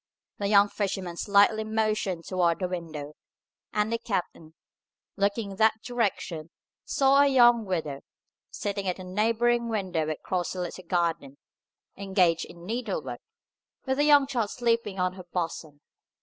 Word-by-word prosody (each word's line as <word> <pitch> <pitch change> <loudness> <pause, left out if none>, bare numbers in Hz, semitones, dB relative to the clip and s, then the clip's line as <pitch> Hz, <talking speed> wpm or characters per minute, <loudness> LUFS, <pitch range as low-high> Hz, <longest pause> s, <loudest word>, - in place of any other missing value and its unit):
The 200 - -1
young 200 0 +6
fisherman 190 -4 -3
slightly 205 +3 +3
motioned 215 -5 -1
toward 175 -3 +1
the 185 - -2
window, 160 -5 -6 0.6
and 210 +2 0
the 230 - 0
captain, 180 -7 -4 0.6
looking 200 +1 0
in 195 - -9
that 220 0 +3
direction, 200 -9 -2 0.3
saw 275 0 +4
a 285 - +5
young 240 -4 +5
widow, 155 -7 -3 0.5
sitting 200 -1 -4
at 180 - -1
a 185 - -8
neighbouring 230 +5 +1
window 185 -8 -1
across 175 +4 -3
a - - -4
little 180 +1 -5
garden, 165 -6 -1 0.6
engaged 190 -4 +1
in 170 0 -13
needlework, 245 - -4 0.6
with 265 +1 -1
a - - +4
young 290 -2 +6
child 240 -6 -1
sleeping 230 -4 0
on 180 0 +1
her 185 -1 -11
bosom. 165 -4 -4
200 Hz, 145 wpm, -27 LUFS, 175-225 Hz, 0.6 s, young